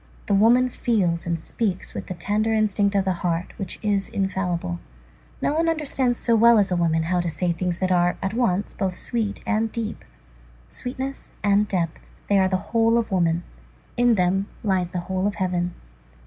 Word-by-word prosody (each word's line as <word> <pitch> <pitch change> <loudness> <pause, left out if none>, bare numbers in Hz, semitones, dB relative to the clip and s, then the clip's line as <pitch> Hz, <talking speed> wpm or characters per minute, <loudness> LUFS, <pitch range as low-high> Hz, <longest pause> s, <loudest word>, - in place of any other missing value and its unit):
The 205 - 0
woman 235 +5 +5
feels 185 -10 0
and 170 -1 -1
speaks 190 +3 -2
with - - -6
the 185 - -5
tender 210 +6 0
instinct 205 -1 +2
of 195 -1 +2
the 190 - +1
heart, 175 0 -1
which 195 -3 -5
is 200 -2 0
infallible. 180 - -2 0.6
No - - +2
one 330 +2 +2
understands 270 -6 0
so 235 - +2
well 230 +1 +6
as 200 -2 +3
a - - +2
woman, 165 -2 +1
how 175 +2 +1
to 175 - -2
say 175 +2 0
things 175 +1 -2
that 185 0 0
are, 175 0 +2
at 195 +1 -2
once, 205 -5 0
both 190 -3 -2
sweet 225 -4 -2
and 225 -1 0
deep. 225 -2 -4 0.7
Sweetness 265 +2 -5
and 205 +1 +3
depth, 170 -5 -1 0.3
they 200 -1 +4
are 190 - +4
the 185 +1 -3
whole 230 0 +4
of 230 -3 -1
woman; 170 -2 +1 0.5
in 245 -1 +4
them 190 +1 +1 0.2
lies 190 -4 +1
the 180 -1 -3
whole 185 +2 -1
of 205 - -2
heaven. 180 -2 -1
195 Hz, 190 wpm, -24 LUFS, 180-225 Hz, 0.7 s, well